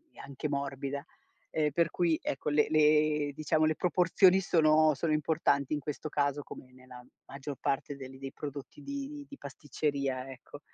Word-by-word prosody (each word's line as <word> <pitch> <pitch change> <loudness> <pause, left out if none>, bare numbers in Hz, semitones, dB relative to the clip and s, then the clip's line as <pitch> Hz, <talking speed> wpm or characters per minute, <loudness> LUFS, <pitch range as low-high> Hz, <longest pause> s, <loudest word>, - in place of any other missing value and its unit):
e - - -16
anche 140 +2 -5
morbida. 140 0 -3 0.5
E 150 -1 +1
per 170 +2 +2
cui 170 -3 +1
ecco 135 - -2
le 150 0 +3
le 150 -1 +3
diciamo, 155 +2 +1
le 155 0 +2
proporzioni 180 +1 +4
sono 155 -3 +4
sono 155 +3 -1
importanti 150 -3 +1
in 150 - 0
questo 150 +1 -5
caso, 145 0 0
come 130 - -11
nella 130 -1 -13 0.3
maggior 140 +1 -6
parte 140 +1 -1
del 135 -1 -10
dei 135 0 -7
prodotti 145 0 -8
di 280 - -6
di 280 - -10
pasticceria 140 -2 -3
ecco. 135 +3 -12
145 Hz, 160 wpm, -31 LUFS, 140-155 Hz, 0.5 s, proporzioni